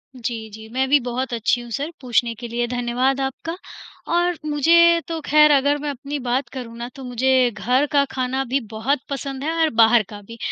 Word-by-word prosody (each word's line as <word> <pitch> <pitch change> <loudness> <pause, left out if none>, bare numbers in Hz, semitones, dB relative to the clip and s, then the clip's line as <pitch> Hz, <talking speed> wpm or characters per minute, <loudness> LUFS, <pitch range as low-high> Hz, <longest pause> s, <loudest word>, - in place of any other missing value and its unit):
जी, 230 -2 -5
जी, 220 +1 -11
मैं 260 +3 0
भी 290 0 +5
बहुत 250 +1 -3
अच्छी 235 +1 +1
हूँ 240 - -10
सर 285 +7 -3
पूछने 240 -2 +1
के 240 +2 -7
लिए 240 +1 -1
धन्यवाद 250 +2 0
आपका। 270 +5 -4 0.6
और 350 -1 +1
मुझे 335 +3 +4
तो 330 -1 -3
खैर 300 0 +6
अगर 285 +1 +3
मैं 295 0 -4
अपनी 285 +2 -5
बात 255 +2 0
करूँ 240 -3 -7
ना 235 - -5
तो 270 - -9
मुझे 255 +1 +2
घर 250 +5 +1
का 285 -1 +4
खाना 260 +1 -1
भी 275 - +3 0.2
बहुत 260 +6 0
पसंद 275 0 -5
है 315 - -1
और 320 - +4
बाहर 225 0 +5
का 205 -1 -9
भी, 230 +3 -12
260 Hz, 205 wpm, -21 LUFS, 240-285 Hz, 0.6 s, खैर